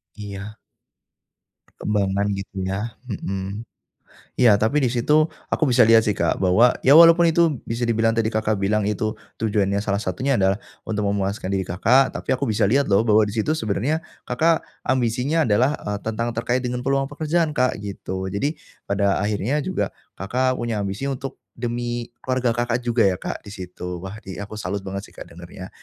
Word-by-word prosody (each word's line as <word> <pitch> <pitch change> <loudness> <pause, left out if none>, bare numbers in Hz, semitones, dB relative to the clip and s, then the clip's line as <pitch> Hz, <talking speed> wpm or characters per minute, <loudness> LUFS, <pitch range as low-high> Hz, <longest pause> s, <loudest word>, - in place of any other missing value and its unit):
Iya. 105 0 -8 1.1
Perkembangan 100 -1 -1
gitu 95 -1 -5
ya, 105 +4 -4
hmm. 100 -2 -4 0.8
Iya 110 -5 +5
tapi 110 +7 +2
di 125 - +3
situ 150 +6 +3 0.2
aku - - 0
bisa 120 - +5
lihat 115 -1 +6
sih 105 - +2
Kak, 85 -3 0
bahwa 110 +7 +5
ya 135 - +7
walaupun 170 +1 +8
itu 160 -5 +2
bisa 115 +1 -2
dibilang 115 -1 +2
tadi 115 -1 +2
Kakak 110 -2 0
bilang 105 +2 +1
itu, 105 +1 -1 0.2
tujuannya 100 -2 +1
salah 100 -1 -1
satunya 130 +10 0
adalah, 95 0 +2 0.3
untuk 105 -1 -2
memuaskan 100 0 -2
diri 95 -1 0
Kakak, 115 +10 +3
tapi - - -7
aku 130 - -4
bisa 105 -2 +2
lihat 140 +4 +3
loh 100 - +5
bahwa 110 0 +5
di 105 - -4
situ 150 +9 +1
sebenarnya, 135 +8 -1 0.2
Kakak 160 +6 +2 0.2
ambisinya 130 +5 +1
adalah 120 +7 +3
e - - -6 0.2
tentang 115 +2 -1
terkait 120 +2 0
dengan 125 0 -2
peluang 135 +1 +1
pekerjaan 155 +1 0
Kak, 125 -4 +1
gitu. 95 -2 -5
Jadi, 140 - -2 0.3
pada 100 0 +1
akhirnya 105 +6 0
juga, 185 0 -1 0.3
Kakak 125 +6 0
punya 120 -2 -2
ambisi 100 +7 -3
untuk, 135 0 -5
demi 120 0 -3
keluarga 130 -1 -1
Kakak 120 +1 0
juga 120 -2 +2
ya 95 - +3
Kak 90 - -6
di 100 - -9
situ, 90 -2 -7
wah 95 +3 -7
di 95 +1 -7
aku 105 +1 -7
salut 100 -1 -3
banget 100 +1 -6
sih - - -19
Kak - - -10
dengarnya. 90 +2 -10
110 Hz, 175 wpm, -22 LUFS, 100-125 Hz, 1.1 s, walaupun